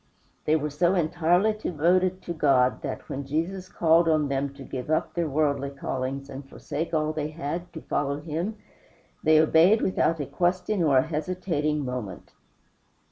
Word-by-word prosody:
They 155 - +3
were 150 -1 -1
so 175 +5 +2
entirely 175 +4 +2
devoted 185 -1 +1
to 170 - -4
God 135 -5 +2
that, - - -5
when 140 - -4
Jesus 170 +7 -3
called 165 0 +3
on 155 -2 +2
them 135 0 -1
to 140 - -10
give 130 +1 -6
up 155 - 0
their 170 -3 -1
worldly 140 -1 0
callings 135 0 -4
and 140 0 -8
forsake 155 +3 -5
all 155 -1 0
they 150 -1 -2
had, 165 +3 -5
to 160 - -7
follow 140 0 -1
him, 170 +8 -4 0.6
they 155 -1 +5
obeyed 165 +7 +5
without 165 -3 +1
a 145 - -2
question 185 +5 0
or 145 -5 +4
a 130 - +5
hesitating 155 -2 -2
moment. 125 -8 -6
155 Hz, 165 wpm, -26 LUFS, 140-175 Hz, 0.6 s, they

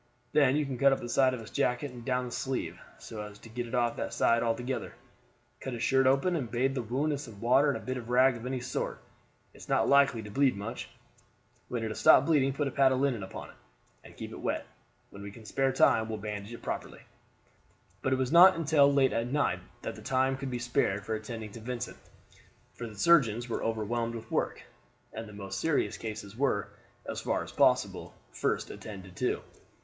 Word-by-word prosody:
Then 140 -3 +4
you 150 0 +1
can 130 -3 -5
cut 140 0 +6
up 135 - +1
the - - -6
side 130 +1 +3
of - - -7
his 110 - -11
jacket 125 +3 0
and 120 -1 -10
down 125 0 0
the 120 - -7
sleeve, 130 +1 -3 0.2
so 110 -2 -8
as 105 -1 -8
to 115 - -14
get 120 +2 -4
it 120 - -4
off 120 -1 +1
that - - -3
side 115 0 +3
altogether. 120 +3 -2 0.6
Cut 130 - -5
his 115 - -4
shirt 135 -1 +3
open, 140 +7 +3
and 130 -8 -2
bathe 125 +3 +1
the 130 - -1
wound 130 +7 -1
with 145 -1 -2
some 115 -8 -10
water 130 +6 +4
and - - -5
bit 130 0 -2
of 120 -2 -8
rag 130 +1 +5
of 115 +1 -7
any 130 0 -2
sort; 125 - -3 0.5
it - - -17
is - - -12
not - - +3
likely 140 -5 +4
to 105 - -9
bleed 135 -1 +2
much. 105 +4 -6 0.8
When 120 -2 -3
it 110 - -2
has 110 - -5
stopped 130 - +7
bleeding 140 -4 +3
put 140 +1 -1
a - - -3
pad 135 0 +4
of 130 - +1
linen 135 -6 +1
upon 95 - -8
it, - - -15 0.5
and - - -15
keep - - -7
it - - -8
wet. - - -2 0.5
When 100 - -10
we 100 - -6
can 110 +2 -13
spare 135 +3 +1
time 110 -4 +4
we 110 - -3
will - - -5
bandage 105 0 -6
it 120 - -9
properly." - - -5 1.0
But 130 - 0
it - - +4
was 130 -1 -1
not 175 +3 +9
until 150 -3 +4
late 135 -2 +3
at 115 +1 0
night 145 +3 +1 0.2
that - - -3
the - - -11
time 130 0 +1
could 135 0 -5
be 125 - -2
spared 120 -5 0
for 110 - -2
attending 110 0 -5
to 115 - -9
Vincent; 120 +1 -5 0.8
for 120 - -6
the 110 - -11
surgeons 120 - +4
were 115 - -3
overwhelmed 115 +1 -1
with 115 - -9
work, - - -1 0.5
and 110 0 -6
the - - -11
most 100 -1 -5
serious 160 -3 +1
cases 110 -2 -7
were, 125 -5 0 0.4
as - - -4
far - - -1
as - - -10
possible, - - +2 0.2
first - - -1
attended 95 -3 -9
to. 125 - -1
125 Hz, 225 wpm, -30 LUFS, 110-135 Hz, 1.0 s, not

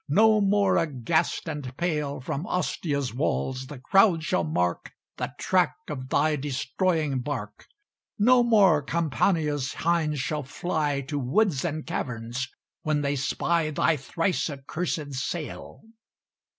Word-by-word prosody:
No 215 +6 +5
more, 200 -1 +3
aghast 155 0 0
and 145 -5 -5
pale, 150 -5 -1
From 140 +6 -4
Ostia's 145 -7 -1
walls 130 -1 -1
the 145 0 -8
crowd 180 - +4
shall 180 +3 +1
mark 90 - -1 0.3
The - - -3
track 185 -2 +2
of 130 -3 -5
thy 150 +1 +2
destroying 145 +2 0
bark. 120 -6 -5 0.5
No 245 +4 +5
more 200 -10 +5
Campania's 150 - 0
hinds 160 -3 +2
shall 150 +3 -1
fly 145 0 -1
To 145 +2 -3
woods 140 - +1
and 155 -2 -3
caverns 125 - -3 0.3
when 155 -1 0
they 145 0 0
spy 155 +4 0
Thy 155 +2 +2
thrice 165 +6 -1
accursed 145 +1 -4
sail." 150 +5 -5
150 Hz, 125 wpm, -26 LUFS, 135-170 Hz, 0.5 s, No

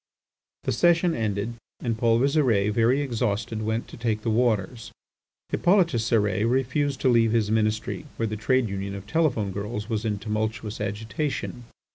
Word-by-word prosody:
The - - 0
session 175 0 +3
ended, 105 -1 -2 0.3
and 115 -2 -1
Paul 115 0 +3
Visire, 125 -7 +2
very 115 +6 +3
exhausted, 115 -4 -2
went 110 +2 -2
to - - -10
take 110 -3 -1
the 115 - 0
waters. 115 -1 0 0.6
Hippolyte 180 -1 +3
Cérès 110 - +1
refused 135 +2 0
to - - +2
leave 115 -2 +4
his 110 -2 +1
Ministry, 110 +5 0
where 115 - 0
the 110 -1 -2
trade 125 +3 +1
union 100 0 -4
of 100 0 -8
telephone 120 -7 +1
girls 105 +3 -5
was 110 -1 -1
in 105 -2 -1
tumultuous 110 +1 -3
agitation. 115 +4 -3
115 Hz, 155 wpm, -25 LUFS, 105-125 Hz, 0.6 s, leave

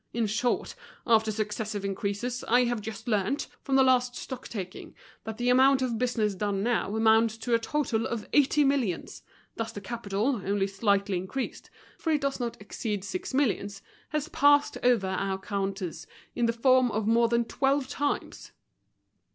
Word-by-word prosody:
In 235 -1 +1
short, 220 +4 -1 0.3
after 220 -2 +3
successive 210 -1 -3
increases, 205 +5 -3
I 245 +2 +5
have 240 -2 -1
just 215 +2 -7
learnt, 215 +5 0 0.2
from 275 - -1
the 265 - +6
last 250 -1 +3
stock 260 0 -7
taking, 190 -5 -7 0.3
that 220 0 -5
the 245 +1 0
amount 260 +1 +5
of 235 -3 -1
business 235 -4 0
done 195 0 -2
now 225 -3 0
amounts 220 0 +4
to 235 +1 -2
a 230 - +4
total 230 -3 -1
of 230 -3 -4
eighty 290 +1 +4
millions; 265 - -1 0.4
thus 225 0 -3
the - - -7
capital, 220 +2 -2
only 200 0 +1
slightly 200 -1 +1
increased—for 255 - -6
it 300 -2 +2
does 275 -1 -1
not 240 -2 -4
exceed 210 -1 -4
six 190 -2 -4
millions—has 260 +3 -2
passed 290 -1 +4
over 245 -5 +3
our 190 +1 -1
counters 195 -2 -4 0.3
in 240 -1 +1
the - - +3
form 255 +1 +4
of 215 -1 -2
more 230 +2 +4
than 235 0 +1
twelve 270 +2 0
times." 285 +1 -3
230 Hz, 160 wpm, -28 LUFS, 205-255 Hz, 0.4 s, the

